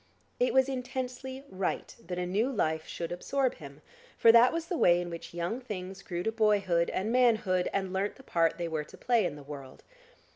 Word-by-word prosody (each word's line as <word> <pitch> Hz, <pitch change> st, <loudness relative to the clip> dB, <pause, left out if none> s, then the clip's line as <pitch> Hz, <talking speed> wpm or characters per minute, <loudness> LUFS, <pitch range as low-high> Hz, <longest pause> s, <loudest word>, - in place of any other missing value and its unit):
It 250 Hz, -, +3 dB
was 265 Hz, 0 st, +4 dB
intensely 260 Hz, 0 st, -4 dB
right 190 Hz, -3 st, -3 dB
that 180 Hz, 0 st, -4 dB
a 180 Hz, -, -1 dB
new 210 Hz, +9 st, 0 dB
life 160 Hz, -9 st, -1 dB
should 170 Hz, -1 st, -5 dB
absorb 260 Hz, +9 st, 0 dB
him, 140 Hz, 0 st, -12 dB, 0.3 s
for 230 Hz, -, +7 dB
that 235 Hz, +2 st, +7 dB
was 330 Hz, 0 st, -2 dB
the 355 Hz, -, -3 dB
way 175 Hz, 0 st, +5 dB
in 175 Hz, -1 st, -4 dB
which 170 Hz, -, -7 dB
young 175 Hz, +9 st, -3 dB
things 190 Hz, -5 st, -6 dB
grew 175 Hz, -1 st, -4 dB
to 220 Hz, -, 0 dB
boyhood 205 Hz, -6 st, +2 dB
and 205 Hz, +4 st, -1 dB
manhood 220 Hz, -7 st, +3 dB
and 190 Hz, -1 st, -2 dB
learnt 195 Hz, +2 st, -1 dB
the 265 Hz, -, -15 dB
part 165 Hz, -8 st, +1 dB
they 170 Hz, -1 st, -2 dB
were 160 Hz, -2 st, -2 dB
to -, -, -15 dB
play 235 Hz, -5 st, +2 dB
in 145 Hz, -, -6 dB
the 145 Hz, -, -11 dB
world. 140 Hz, -2 st, -10 dB
195 Hz, 210 wpm, -30 LUFS, 175-245 Hz, 0.3 s, for